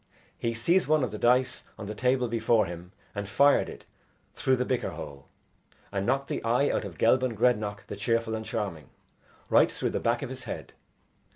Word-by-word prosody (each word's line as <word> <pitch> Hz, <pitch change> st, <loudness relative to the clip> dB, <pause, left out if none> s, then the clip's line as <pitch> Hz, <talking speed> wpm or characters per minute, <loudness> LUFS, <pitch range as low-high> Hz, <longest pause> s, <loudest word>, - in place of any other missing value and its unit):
He 115 Hz, 0 st, -2 dB
seized 170 Hz, +11 st, +2 dB
one 155 Hz, -2 st, +3 dB
of 120 Hz, -, -1 dB
the 105 Hz, -, -6 dB
dice 125 Hz, +2 st, +2 dB
on 110 Hz, -, -6 dB
the 105 Hz, -, -4 dB
table 125 Hz, +3 st, +1 dB
before 115 Hz, -1 st, +2 dB
him 85 Hz, 0 st, -8 dB, 0.2 s
and 100 Hz, -1 st, -4 dB
fired 140 Hz, +7 st, +4 dB
it -, -, -11 dB, 0.5 s
through 130 Hz, -, +2 dB
the 125 Hz, 0 st, -1 dB
bicker 125 Hz, -1 st, -1 dB
hole, 70 Hz, -2 st, -9 dB, 0.6 s
and 100 Hz, -1 st, -2 dB
knocked 135 Hz, +2 st, +1 dB
the -, -, -3 dB
eye 120 Hz, +5 st, +2 dB
out -, -, -1 dB
of 90 Hz, -5 st, -8 dB
Gelban 125 Hz, +3 st, +3 dB
Grednach 105 Hz, -3 st, +1 dB
the -, -, -6 dB
Cheerful 115 Hz, +2 st, 0 dB
and 110 Hz, 0 st, -3 dB
Charming, 95 Hz, -, -4 dB, 0.6 s
right -, -, +5 dB
through -, -, -2 dB
the -, -, -1 dB
back 120 Hz, +4 st, 0 dB
of 135 Hz, -, -4 dB
his 130 Hz, -2 st, -8 dB
head. 110 Hz, -, -6 dB
115 Hz, 195 wpm, -28 LUFS, 105-125 Hz, 0.6 s, right